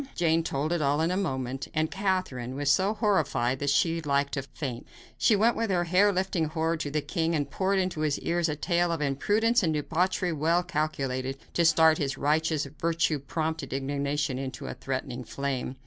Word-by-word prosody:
Jane 165 Hz, -1 st, +2 dB
told 155 Hz, +1 st, -1 dB
it 170 Hz, -, 0 dB
all 145 Hz, +1 st, +2 dB
in 165 Hz, +2 st, +1 dB
a -, -, 0 dB
moment, 135 Hz, -8 st, -2 dB
and 155 Hz, 0 st, +1 dB
Catherine 185 Hz, -11 st, -2 dB
was 140 Hz, 0 st, +1 dB
so 195 Hz, +7 st, +2 dB
horrified 150 Hz, -, +1 dB
that 145 Hz, -, 0 dB
she 165 Hz, +4 st, +3 dB
was 160 Hz, -2 st, -6 dB
like 140 Hz, 0 st, +1 dB
to 135 Hz, -, -2 dB
faint. 130 Hz, -3 st, -6 dB, 0.3 s
She 220 Hz, -, +3 dB
went 225 Hz, +4 st, +3 dB
with 230 Hz, -1 st, -1 dB
her 180 Hz, -2 st, +2 dB
hair 185 Hz, +4 st, +4 dB
lifting 185 Hz, -3 st, 0 dB
horror 160 Hz, +1 st, -1 dB
to 150 Hz, -2 st, -3 dB
the 150 Hz, +1 st, -1 dB
king, 165 Hz, -2 st, -1 dB
and 145 Hz, -2 st, 0 dB
poured 195 Hz, +4 st, +1 dB
into 185 Hz, -4 st, -1 dB
his 150 Hz, -2 st, +1 dB
ears 170 Hz, -1 st, 0 dB
a 150 Hz, -, -1 dB
tale 175 Hz, +2 st, +1 dB
of 165 Hz, -, -1 dB
imprudence 210 Hz, -, +2 dB
and 160 Hz, -4 st, +1 dB
debauchery 175 Hz, +4 st, 0 dB
well 165 Hz, +4 st, +2 dB
calculated 135 Hz, -5 st, -2 dB, 0.2 s
to 170 Hz, -, +2 dB
start 160 Hz, -1 st, +5 dB
his 135 Hz, -2 st, -1 dB
righteous, 155 Hz, +1 st, +1 dB
virtue 165 Hz, -2 st, +1 dB
prompted 155 Hz, 0 st, -3 dB
indignation 140 Hz, 0 st, -1 dB
into 135 Hz, -1 st, -6 dB
a -, -, -4 dB
threatening 130 Hz, -1 st, -4 dB
flame. 135 Hz, -1 st, -3 dB
155 Hz, 195 wpm, -28 LUFS, 140-175 Hz, 0.3 s, start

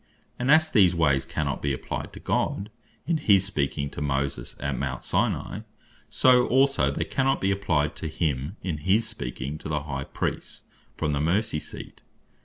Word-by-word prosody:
And 125 Hz, +2 st, -1 dB
as 155 Hz, +2 st, +6 dB
these 95 Hz, -6 st, +5 dB
ways 70 Hz, -5 st, +2 dB
cannot 70 Hz, -2 st, -2 dB
be 70 Hz, -1 st, 0 dB
applyed 65 Hz, -, -5 dB
to -, -, -9 dB
God, 100 Hz, +3 st, -1 dB, 0.3 s
in 165 Hz, +1 st, +1 dB
his 100 Hz, -10 st, +4 dB
speaking 70 Hz, -6 st, -1 dB
to -, -, -7 dB
Moses, 70 Hz, -3 st, -2 dB
at -, -, -2 dB
Mount 65 Hz, -3 st, -3 dB
Sinai; -, -, -1 dB, 0.5 s
so 125 Hz, -1 st, +5 dB
also, 135 Hz, +2 st, +3 dB
they -, -, -1 dB
cannot 135 Hz, 0 st, +1 dB
be 95 Hz, -, +1 dB
applyed 80 Hz, -7 st, 0 dB
to 80 Hz, -, -4 dB
him, 75 Hz, 0 st, -2 dB
in 85 Hz, -5 st, -2 dB
his 100 Hz, +8 st, +2 dB
speaking 65 Hz, -, -5 dB
to -, -, -7 dB
the 75 Hz, -2 st, -1 dB
High 70 Hz, -2 st, -4 dB
Priests, -, -, -4 dB, 0.3 s
from 75 Hz, -, 0 dB
the 70 Hz, 0 st, 0 dB
Mercy 85 Hz, +1 st, +1 dB
Seat. -, -, -8 dB
80 Hz, 175 wpm, -26 LUFS, 70-105 Hz, 0.5 s, as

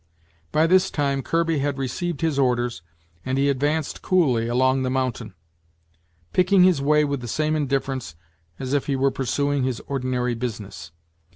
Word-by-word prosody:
By 155 Hz, +1 st, +3 dB
this 185 Hz, +2 st, +4 dB
time, 140 Hz, -2 st, -1 dB
Kirby 165 Hz, +1 st, 0 dB
had 140 Hz, 0 st, -1 dB
received 140 Hz, +5 st, -3 dB
his 160 Hz, -4 st, 0 dB
orders, 120 Hz, -5 st, 0 dB, 0.4 s
and 130 Hz, +1 st, -2 dB
he 140 Hz, +1 st, +2 dB
advanced 145 Hz, +3 st, -1 dB
coolly 130 Hz, -11 st, +2 dB
along 130 Hz, +2 st, +2 dB
the 130 Hz, -, -1 dB
mountain, 125 Hz, -6 st, -2 dB, 1.0 s
picking 185 Hz, +1 st, +4 dB
his 180 Hz, -6 st, +4 dB
way 150 Hz, +2 st, +3 dB
with 140 Hz, -2 st, -2 dB
the 120 Hz, -, -6 dB
same 155 Hz, +6 st, 0 dB
indifference 135 Hz, -, -2 dB, 0.4 s
as 130 Hz, +1 st, -4 dB
if 145 Hz, -, 0 dB
he 140 Hz, -, 0 dB
were 135 Hz, +1 st, +2 dB
pursuing 140 Hz, +2 st, -1 dB
his 130 Hz, -2 st, -1 dB
ordinary 125 Hz, -2 st, -2 dB
business. 105 Hz, -8 st, -6 dB
135 Hz, 160 wpm, -23 LUFS, 125-150 Hz, 1.0 s, this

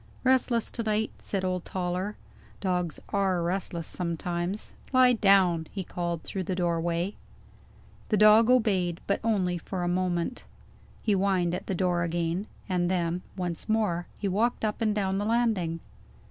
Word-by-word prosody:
"Restless 255 Hz, -3 st, +2 dB
to 235 Hz, -, -3 dB
night," 215 Hz, 0 st, 0 dB
said 195 Hz, -2 st, -2 dB
old 185 Hz, -1 st, -1 dB
Toller. 185 Hz, +3 st, -3 dB, 0.4 s
"Dogs 180 Hz, -4 st, -1 dB
are 190 Hz, -3 st, +1 dB
restless 175 Hz, -2 st, -2 dB
sometimes. 175 Hz, +3 st, -3 dB, 0.2 s
Lie 255 Hz, -1 st, +6 dB
down!" 190 Hz, -7 st, +4 dB
he 195 Hz, -, -4 dB
called 170 Hz, -2 st, -3 dB
through 190 Hz, -2 st, -4 dB
the 185 Hz, -, -1 dB
doorway. 170 Hz, +1 st, 0 dB, 1.0 s
The 215 Hz, -, +3 dB
dog 215 Hz, +2 st, +7 dB
obeyed, 195 Hz, -9 st, +2 dB
but 200 Hz, -, +1 dB
only 185 Hz, -6 st, +1 dB
for 180 Hz, +2 st, -4 dB
a -, -, 0 dB
moment. 180 Hz, +4 st, -1 dB, 0.6 s
He 215 Hz, -, +1 dB
whined 190 Hz, -3 st, +2 dB
at 180 Hz, -, -4 dB
the 190 Hz, -, -1 dB
door 175 Hz, -1 st, +1 dB
again 170 Hz, +3 st, -1 dB, 0.2 s
and 180 Hz, -2 st, +1 dB
then, 175 Hz, -1 st, 0 dB, 0.2 s
once 175 Hz, +1 st, -3 dB
more, 210 Hz, -6 st, +1 dB
he 205 Hz, -, -2 dB
walked 220 Hz, +4 st, +1 dB
up 215 Hz, +2 st, -2 dB
and 215 Hz, -2 st, +2 dB
down 195 Hz, -2 st, 0 dB
the -, -, -1 dB
landing. 215 Hz, -8 st, +1 dB
185 Hz, 155 wpm, -28 LUFS, 175-210 Hz, 1.0 s, dog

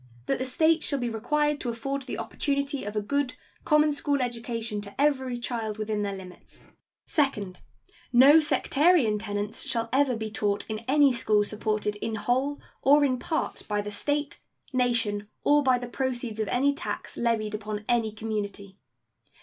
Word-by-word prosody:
That -, -, 0 dB
the 260 Hz, -, -2 dB
States 315 Hz, +4 st, +3 dB
shall 280 Hz, -, 0 dB
be 240 Hz, -3 st, -2 dB
required 295 Hz, +6 st, 0 dB
to 245 Hz, -, -3 dB
afford 275 Hz, +4 st, -3 dB
the 265 Hz, -, -5 dB
opportunity 280 Hz, -3 st, -2 dB
of 205 Hz, +1 st, -5 dB
a 210 Hz, -, 0 dB
good 280 Hz, +3 st, -1 dB, 0.3 s
common 300 Hz, 0 st, +4 dB
school 285 Hz, 0 st, 0 dB
education 230 Hz, -3 st, -3 dB
to 200 Hz, +3 st, -11 dB
every 265 Hz, -4 st, +1 dB
child 230 Hz, -3 st, -3 dB
within 215 Hz, -1 st, -2 dB
their 200 Hz, -1 st, -2 dB
limits. 185 Hz, -1 st, -12 dB, 0.4 s
Second. 210 Hz, -, -1 dB, 0.5 s
No 275 Hz, +6 st, +8 dB
sectarian 295 Hz, -6 st, +3 dB
tenets 205 Hz, 0 st, -4 dB
shall 230 Hz, -4 st, -2 dB
ever 270 Hz, -2 st, +3 dB
be 220 Hz, -1 st, -4 dB
taught 205 Hz, -2 st, -1 dB
in 215 Hz, -1 st, -3 dB
any 280 Hz, -1 st, +5 dB
school 215 Hz, -3 st, +2 dB
supported 210 Hz, 0 st, -2 dB
in 220 Hz, +1 st, -3 dB
whole 260 Hz, +6 st, 0 dB, 0.2 s
or 290 Hz, +2 st, +5 dB
in 255 Hz, -2 st, 0 dB
part 315 Hz, +5 st, -2 dB
by 210 Hz, -1 st, 0 dB
the 210 Hz, 0 st, -4 dB
State, 290 Hz, +7 st, -2 dB, 0.3 s
nation, 230 Hz, -5 st, +1 dB, 0.2 s
or 295 Hz, 0 st, +5 dB
by 260 Hz, -3 st, +3 dB
the 245 Hz, 0 st, -6 dB
proceeds 245 Hz, -3 st, -3 dB
of 215 Hz, -, 0 dB
any 275 Hz, +6 st, +2 dB
tax 330 Hz, +5 st, -5 dB
levied 225 Hz, -3 st, 0 dB
upon 210 Hz, 0 st, -4 dB
any 230 Hz, -3 st, +2 dB
community. 205 Hz, -2 st, -5 dB
240 Hz, 165 wpm, -27 LUFS, 215-280 Hz, 0.5 s, No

